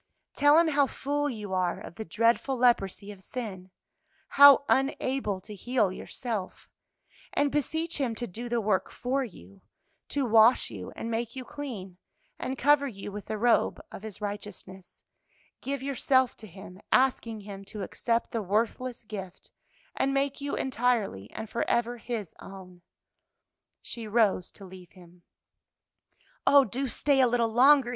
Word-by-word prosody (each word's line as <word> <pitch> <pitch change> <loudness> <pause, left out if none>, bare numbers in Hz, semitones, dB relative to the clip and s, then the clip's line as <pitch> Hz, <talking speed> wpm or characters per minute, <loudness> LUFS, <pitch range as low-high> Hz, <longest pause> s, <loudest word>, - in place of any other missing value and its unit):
Tell 290 +1 +5
Him 335 -1 +5
how 285 -2 +3
full 290 +2 -2
you 210 -6 -6
are 180 -2 0
of - - -10
the 220 - -6
dreadful 230 +7 +1
leprosy 210 -5 +1
of 200 -2 -13
sin, 190 -5 -7 0.6
how 280 0 +8
unable 265 -6 0
to 210 - -10
heal 215 -1 0
yourself, 210 0 -5 0.7
and 285 -1 +1
beseech 320 +3 -1
Him 245 -5 -1
to 240 - -4
do 235 +4 -7
the 240 0 +1
work 200 -4 0
for 265 +2 -2
you, 95 - -12 0.5
to 280 -2 -1
wash 225 - +5
you 95 -4 -7
and 230 - -5
make 230 +1 -3
you 260 -1 -6
clean 215 -11 -7 0.4
and 260 +1 -3
cover 290 0 +4
you 205 -4 -7
with 205 0 -7
the 215 - -3
robe 235 +2 +2
of - - -9
His 215 -2 -8
righteousness; 200 -2 -8 0.6
give 275 -1 -4
yourself 260 -2 +2
to 220 - -10
Him, 190 0 -12
asking 240 -4 +2
Him 195 -1 -9
to 205 0 -6
accept 230 +4 -1
the 230 - -2
worthless 230 +5 -1
gift 195 -4 -9 0.4
and 275 0 0
make 275 0 0
you 285 0 -2
entirely 230 - -1
and 220 - -7
forever 235 +2 -1
His 225 -5 -5
own." 185 -2 -12 1.0
She 230 -2 -5
rose 210 -5 +2
to 200 - -12
leave 185 -2 -13
him. 175 -1 -17 1.3
"Oh, 280 -1 +7
do 265 +6 -2
stay 280 +2 +1
a 255 - +5
little 235 -1 +1
longer!" 265 +1 +6
230 Hz, 155 wpm, -28 LUFS, 195-265 Hz, 1.3 s, how